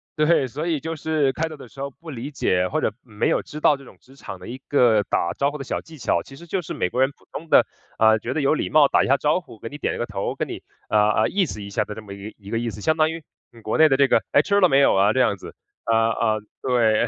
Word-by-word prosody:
对， 155 -2 +3
所 150 +8 -5
以 160 -4 0
就 160 +2 -4
是 155 -3 0
开 165 +3 -1
头 155 - -8
的 130 - -12
时 135 - -16
候 140 - -3
不 160 +5 -14
理 130 +1 -6
解， 90 -9 +1
或 - - -1
者 110 - 0
没 110 -3 -2
有 - - +1
知 150 - -9
道 145 -2 +4
这 140 - -14
种 - - -16
职 135 - -20
场 95 -8 -9
的 90 - -11
一 125 +2 -6
个 120 -6 +4
打 85 -3 -1
招 140 - +1
呼 150 - -6
的 135 - -6
小 - - -3
技 160 -1 -14
巧， - - 0
其 135 - -13
实 170 +5 -12
就 180 +2 -2
是 155 - -7
美 90 - -1
国 125 - -1
人 135 - +4
普 - - -28
通 165 +1 -8
的， - - +6 0.3
呃， 110 0 +5
觉 120 +4 -4
得 155 - -1
有 140 - +3
礼 - - -2
貌， 150 -2 +6
打 - - +3
一 - - -1
下 140 - +4
招 150 +6 +1
呼， 115 - -15
给 115 - -7
你 145 - -8
点 - - -2
一 - - -5
个 120 - -2
头， 100 -2 -4
跟 - - -3
你， - - -7 0.3
呃， 105 0 +4
呃， - - +1
意 195 -2 +1
思 105 -9 -7
一 100 - -8
下 105 +1 0
的 105 - -7
这 110 - -8
么 100 -2 -9
一 100 +2 -9
一 100 -1 -12
个 115 - 0
意 120 - -2
思， 105 - -9
相 160 +8 +1
当 155 0 +3
于 165 -1 -6 0.3
你 115 -1 -16
国 110 - -2
内 160 - +7
的 135 - +4
这 140 0 +5
个 - - +3
“唉， - - +5
吃 200 0 +2
了 185 - +6
没 135 - +4
有 - - +5
啊？” 100 +2 +4
这 130 - 0
样 110 -5 +2
子。 - - -11 0.3
呃， 115 - +2 0.2
呃， 110 -2 0 0.2
对， 120 -3 +2
130 Hz, 340 characters per minute, -23 LUFS, 110-150 Hz, 0.3 s, 内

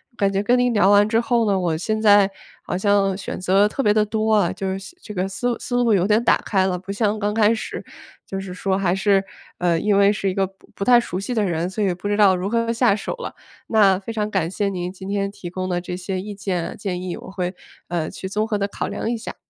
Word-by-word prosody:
感 200 -3 +1
觉 195 +1 0
跟 245 +4 +3
您 245 0 +2
聊 205 -3 +4
完 205 +1 +5
之 225 +1 +3
后 235 -1 +1
呢， 195 -1 +2
我 170 -3 0
现 215 +7 -2
在 205 -2 +5 0.3
好 - - -3
像 195 -1 +2
选 200 - -6
择 190 +3 +3
特 240 - -3
别 210 - +3
地 210 0 +3
多 220 +1 -1
啊， 200 -5 +2
就 195 - -4
是 190 - -2
现 195 - -11
这 210 - -9
个 185 +1 0
思 240 +5 -2
思 245 - -4
路 240 -2 +3
有 185 0 +2
点 215 +2 +3
打 235 - +4
开 190 -2 +2
了， 180 -1 -1
不 190 +2 -7
像 210 +1 0
刚 210 0 -1
开 215 -1 +4
始 220 - -6 0.4
就 195 - -5
是 190 -1 -6
说 190 +1 -1
还 185 -3 +1
是， 195 0 +2 0.3
呃， 175 -2 +1
因 205 +2 +2
为 200 +1 +5
是 200 -2 -1
一 - - -2
个 195 - +2
不 190 +1 -17
不 200 - -3
太 245 -1 +7
熟 185 -6 -4
悉 200 +6 -4
的 220 -3 +1
人， 170 -3 -1
所 200 +3 -2
以 195 - +2
不 185 +3 -6
知 205 - +1
道 205 -3 +5
如 180 +1 -3
何 230 +2 0
下 230 -3 +3
手 205 - -4
了。 - - -7 0.3
那 200 -4 +4
非 200 +4 -7
常 210 -1 -1
感 190 -6 0
谢 200 +1 -1
您 180 -1 -4
今 190 0 -9
天 200 0 -1
提 180 -3 -8
供 185 +1 -4
的 175 -1 -1
这 180 0 -5
些 185 0 -3
意 205 +1 -7
见、 185 -3 -3
建 185 -3 -3
议， 180 -1 -4
我 - - -10
会， 180 -1 -3 0.3
呃， 170 -2 -2
去 190 - -7
综 215 +3 -1
合 210 -2 -1
地 200 - 0
考 200 - -4
量 - - -3
一 235 - -1
下。 225 - -8
200 Hz, 290 characters per minute, -22 LUFS, 185-215 Hz, 0.4 s, 太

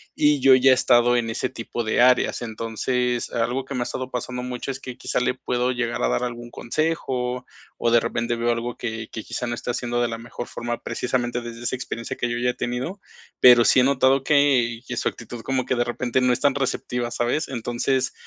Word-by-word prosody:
y 150 -1 +3
yo 135 0 +7
ya 130 +1 +5
he - - +8
estado 120 -1 +4
en 115 -1 -1
ese 125 +3 -2
tipo 120 -1 -5
de 110 - 0
áreas. 125 0 +4
Entonces, 120 +2 -2
algo 120 +3 -1
que 140 - -7
me 125 - -1
ha - - +2
estado 130 +1 -5
pasando 125 0 -4
mucho 125 +1 -4
es 130 - -6
que 125 -2 -8
quizá - - -2
le 125 - +1
puedo 125 0 -1
llegar 120 -1 -2
a - - +2
dar - - 0
algún 120 -1 -5
consejo, 125 -3 -2 0.3
o 115 - +1
de 120 - +6
repente 120 0 -2
veo 120 +1 +1
algo 120 +1 -3
que 110 -2 -5
que 110 - -6
quizá 125 - -4
no 120 - -2
está 125 - -3
haciendo 120 0 -1
de 120 - +2
la 115 -1 -4
mejor 120 +1 -7
forma, 120 0 -4
precisamente 120 -1 -2
desde 120 0 -8
esa 120 - 0
experiencia 115 -2 -5
que 120 - -2
yo 120 - -2
ya 125 +1 +1
he - - -12
tenido, 125 +12 -4 0.4
pero 120 -2 +8
sí 130 - +6
he - - +4
notado 135 0 +3
que 135 -6 +3
que - - -4
su - - 0
actitud 120 0 -9
como 130 +1 -1
que 130 - 0
de 120 - +2
repente 120 +1 -1
no 125 0 +3
es 120 - +1
tan 140 -2 +2
receptiva, 125 -3 -2
¿sabes? 120 +6 -1
Entonces, 125 +1 -1
120 Hz, 230 wpm, -23 LUFS, 120-130 Hz, 0.4 s, he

